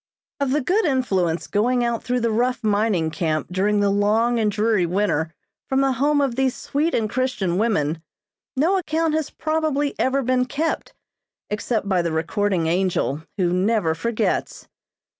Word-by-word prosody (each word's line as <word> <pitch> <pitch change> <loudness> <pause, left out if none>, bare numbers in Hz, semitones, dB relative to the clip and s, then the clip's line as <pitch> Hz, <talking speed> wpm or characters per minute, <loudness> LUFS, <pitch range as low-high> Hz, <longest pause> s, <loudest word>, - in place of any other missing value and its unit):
Of 280 -2 0
the 295 +3 +1
good 385 - +1
influence 195 - 0
going 240 +4 +1
out 235 -1 -1
through 250 0 -1
the 230 -1 +1
rough 245 +2 0
mining 205 -6 +1
camp 155 -3 -1
during 205 +3 +1
the 200 -1 +2
long 220 +4 +2
and 215 -2 +2
dreary 210 -3 +1
winter 170 -4 0 0.4
from 265 0 +2
the 270 0 +2
home 285 +4 +2
of 275 -3 +1
these 265 -1 +1
sweet 310 +4 -1
and 220 -2 +1
Christian 210 -7 -1
women, 165 -8 0 0.5
no 340 +8 +2
account 325 -2 0
has 315 -2 -1
probably 310 -2 -1
ever 270 +1 +1
been 250 0 +2
kept, 300 +6 -3 0.6
except 210 0 -1
by 185 -3 +2
the 170 -1 -2
recording 170 +2 0
angel, 170 -4 0 0.2
who 180 -3 +1
never 185 -2 +1
forgets. 215 +8 -2
225 Hz, 160 wpm, -22 LUFS, 185-265 Hz, 0.6 s, the